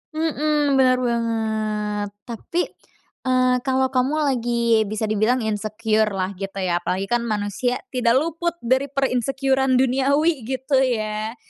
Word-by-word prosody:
Mhm. 300 -3 +1
Bener 255 -1 +4
banget. 220 -3 -1
Tapi, 250 +9 -3 0.7
eee, 255 0 +3
kalo 260 0 +1
kamu 260 +3 +1
lagi 235 -4 +1
bisa 215 +1 -3
dibilang 220 +3 +1
insecure-lah 215 -2 0
gitu, 195 0 -5
ya, 175 -1 +1
apalagi 190 +2 -2
kan 240 0 +2
manusia 215 +4 -1 0.2
tidak 245 -2 +2
luput 335 +4 0
dari 260 +4 +2
per-insecure-an 265 0 +1
duniawi, 270 +1 +2
gitu, 265 +1 0
ya? 220 -3 -1
245 Hz, 120 wpm, -22 LUFS, 215-265 Hz, 0.7 s, Bener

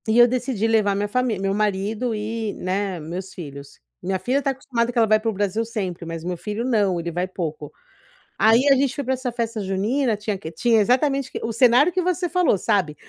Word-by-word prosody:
E 220 +1 +2
eu 240 0 +8
decidi 245 -3 -1
levar 215 -3 +2
minha 205 +1 -1
família, 230 -2 -1
meu 195 0 0
marido 210 +3 -1
e, 215 0 -3
né, 190 0 -2
meus 180 +5 -6
filhos, 140 -4 -10 0.2
minha 190 +1 -1
filha 255 +8 0
está 280 - -1
acostumada 250 -3 -1
que 245 - -7
ela 230 - +5
vai 215 0 +4
para 225 +1 -1
o - - -2
Brasil 205 +2 -1
sempre 195 -7 -4
mas 165 -1 -6
o - - -6
meu 180 -1 -2
filho 210 +6 -4
não, 205 -8 +1
ele 170 0 -4
vai 180 +2 -2
pouco. 155 -5 -5 0.7
Aí 225 +5 +4
a 275 - +7
gente 270 -1 +1
foi 285 - -3
pra 260 +1 0
essa 255 -1 -4
festa 230 -1 -3
junina 215 +6 0
tinha 210 -1 -3
que? 160 -3 -8
Tinha 225 +7 +2
exatamente 265 +4 +1
o - - -29
que - - -5
O 230 - -2
cenário 250 +7 +5
que 365 - 0
você 360 0 -1
falou 355 - +2
sabe, 175 -6 0
215 Hz, 235 wpm, -22 LUFS, 190-245 Hz, 0.7 s, eu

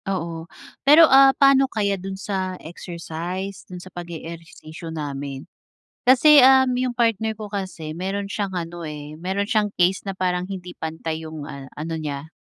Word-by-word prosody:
Oo, 170 -3 -4 0.3
pero, 300 +4 +8
ah, 270 -2 +7
paano 275 -1 +5
kaya 205 -4 0
do'n 195 0 -5
sa 190 -2 -3
exercise, 175 +3 -6
do'n 180 - -7
sa 185 0 -12
pag-e-ehersisyo 165 -1 -9
namin. 140 -2 -5 0.6
Kasi, 265 +2 +7
um, 265 0 +6
yung 255 0 0
partner 225 -2 +1
ko 215 -1 -8
kasi 185 -6 -5
mayro'n 195 +3 -3
siyang 200 -1 -3
ano, 170 -1 -5
eh, 150 0 -7
mayro'n 190 +4 -2
siyang 215 -2 +2
case 180 +2 +2
na 195 - -3
parang 180 -1 -1
hindi 180 -2 -8
pantay 160 0 -4
yung, 155 -2 -7
ah, 140 -2 -8
ano 160 +2 -5
niya, 150 -1 -5
180 Hz, 160 wpm, -23 LUFS, 160-205 Hz, 0.6 s, pero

